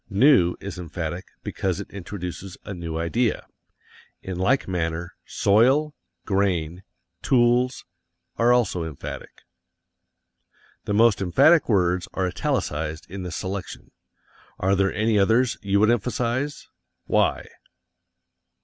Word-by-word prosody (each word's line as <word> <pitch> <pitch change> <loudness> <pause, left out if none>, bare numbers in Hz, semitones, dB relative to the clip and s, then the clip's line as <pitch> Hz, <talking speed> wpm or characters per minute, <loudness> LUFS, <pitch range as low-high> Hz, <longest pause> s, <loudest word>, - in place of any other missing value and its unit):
"New" 100 - +4
is 95 -2 -7
emphatic 85 +1 -5 0.2
because 95 -1 -2
it 100 - -8
introduces 95 0 -7
a 100 - -5
new 85 -3 -5
idea. 110 +9 0 0.8
In 95 -2 -5
like 125 +9 +2
manner, 85 -2 -3
"soil," 130 +9 +3 0.3
"grain," 90 -4 0 0.4
"tools," 125 0 +2 0.5
are 120 +1 +3
also 110 -8 +2
emphatic. 80 -4 -8 1.4
The 100 - -1
most 110 -2 +4
emphatic 135 - +4
words 90 -4 +2
are 95 - 0
italicized 80 -2 -2
in 100 0 -6
this 90 -3 -5
selection. 95 0 -6 0.7
Are 95 +1 +1
there 95 0 +2
any 110 0 +1
others 115 +5 +3
you 100 0 +1
would 110 +2 +4
emphasize? 120 +5 -2 0.4
Why? - - +1
100 Hz, 115 wpm, -24 LUFS, 90-115 Hz, 1.4 s, New